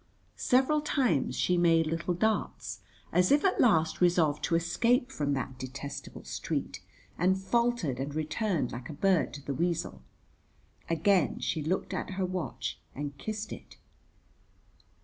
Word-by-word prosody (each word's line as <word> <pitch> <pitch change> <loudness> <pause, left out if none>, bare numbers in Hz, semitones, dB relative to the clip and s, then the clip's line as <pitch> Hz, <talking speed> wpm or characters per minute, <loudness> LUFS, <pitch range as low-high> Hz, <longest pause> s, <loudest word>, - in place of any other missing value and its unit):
Several 270 +4 +3
times 255 - +1
she 180 -1 +2
made 165 -1 +4
little 165 +3 -1
darts, 220 +4 -1 0.3
as 180 0 +3
if 290 +6 +4
at 380 - +3
last 165 -9 +3
resolved 170 -4 +3
to 165 - +1
escape 235 +10 +2
from 145 - -1
that 130 -1 -4
detestable 140 +2 -7
street, - - -4 0.4
and 185 +2 +3
faltered 200 - 0
and 140 +2 -4
returned 155 - -1
like 120 +4 -7
a - - -5
bird 190 +2 +2
to 145 - -10
the 140 - -2
weasel. 170 +4 -1 0.9
Again 165 0 +2
she 160 - -1
looked 170 +6 -1
at - - -3
her 190 - +1
watch 180 -2 -4 0.2
and 145 0 -4
kissed 215 0 -4
it. - - -12
175 Hz, 145 wpm, -30 LUFS, 150-210 Hz, 0.9 s, made